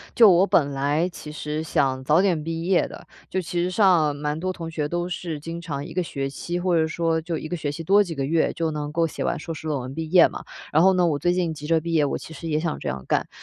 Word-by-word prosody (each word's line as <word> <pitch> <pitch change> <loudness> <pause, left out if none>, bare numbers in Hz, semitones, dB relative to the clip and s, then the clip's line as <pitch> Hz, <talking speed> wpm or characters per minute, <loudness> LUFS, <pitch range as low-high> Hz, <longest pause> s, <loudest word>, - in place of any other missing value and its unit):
就 225 -3 +8
我 180 +2 +4
本 145 -7 +3
来 145 +5 0
其 165 -3 -10
实 150 0 -4
想 135 -4 0
早 155 +5 +4
点 180 -5 +1
毕 165 +1 -4
业 180 0 +2
的， - - -11 0.2
就 190 - -1
其 175 0 -2
实 180 - 0
上 180 -7 +3
蛮 150 +1 -3
多 185 +2 -2
同 165 -2 -7
学 150 -2 -2
都 175 +3 -2
是 165 -2 -4
经 165 +2 -6
常 145 -4 -5
1 - - -9
个 185 - 0
学 140 -5 -3
期， 170 +5 -4
或 180 0 0
者 160 0 +2
说 165 0 0
就 165 0 -3
1 155 - -6
个 175 - -2
学 150 -2 -3
期 165 +3 -6
多 200 +5 +5
几 170 -4 -6
个 140 - -2
月 160 +4 +1
就 165 -1 -1
能 150 -1 -4
够 165 +1 +2
写 - - -5
完 - - 0
硕 165 - -5
士 155 0 -7
论 150 -2 0
文 130 +2 -7
毕 160 +1 -5
业 180 +1 +6
嘛。 - - -8 0.3
然 155 - +4
后 190 +2 +6
呢 180 -1 +3
我 150 -4 +1
最 175 +4 +2
近 175 -3 0
急 150 -1 -8
着 165 0 +3
毕 170 +1 -4
业， 155 -3 +3
我 140 - -1
其 160 - -10
实 165 - -7
也 155 -1 +1
想 170 -2 -2
这 - - -6
样 65 0 -3
干。 - - +1
165 Hz, 305 characters per minute, -24 LUFS, 150-175 Hz, 0.3 s, 就